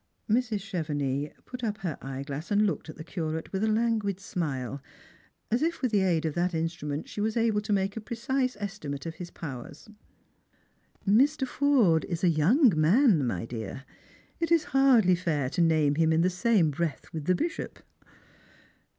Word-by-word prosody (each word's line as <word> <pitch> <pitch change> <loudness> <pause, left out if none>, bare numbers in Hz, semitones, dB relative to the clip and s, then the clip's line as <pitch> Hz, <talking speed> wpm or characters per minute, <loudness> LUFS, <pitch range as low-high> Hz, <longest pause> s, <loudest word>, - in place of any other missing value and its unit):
Mrs. 225 -2 +1
Chevenix 150 -7 -2
put 250 0 -8
up 210 -2 -1
her 170 -6 -2
eyeglass 135 +3 -6
and 210 0 +3
looked 195 - -2
at - - -8
the 155 - -8
Curate 160 -1 -4
with 190 +2 -1
a - - +2
languid 215 -3 0
smile, 140 -8 -4 0.7
as 235 - +2
if 330 -2 -1
with 255 - +1
the 210 - +3
aid 170 -4 +1
of 155 - -1
that 175 +1 0
instrument 160 -2 -3
she 205 - -5
were 215 - +2
able 225 -3 +2
to 215 +1 -5
make 195 0 +1
a 225 - -4
precise 255 +2 -2
estimate 185 -9 -5
of 165 - -4
his 175 - -6
powers. 145 - -8 0.6
" - - -39
Mr. 265 +7 +3
Forde 250 - +3
is 170 0 -4
a 180 - +5
young 200 - +4
man, 165 - +4
my 95 -3 -2
dear. 115 +2 -6 0.6
It 335 0 -1
is 335 -2 +5
hardly 255 -9 +5
fair 155 -7 -1
to - - 0
name 155 -3 +3
him 160 +1 +2
in 160 +1 +3
the 180 +2 +2
same 185 -4 +2
breath 155 0 -4
with 155 -3 -5
the 185 - +3
bishop." 330 - -3
180 Hz, 180 wpm, -28 LUFS, 155-225 Hz, 0.7 s, a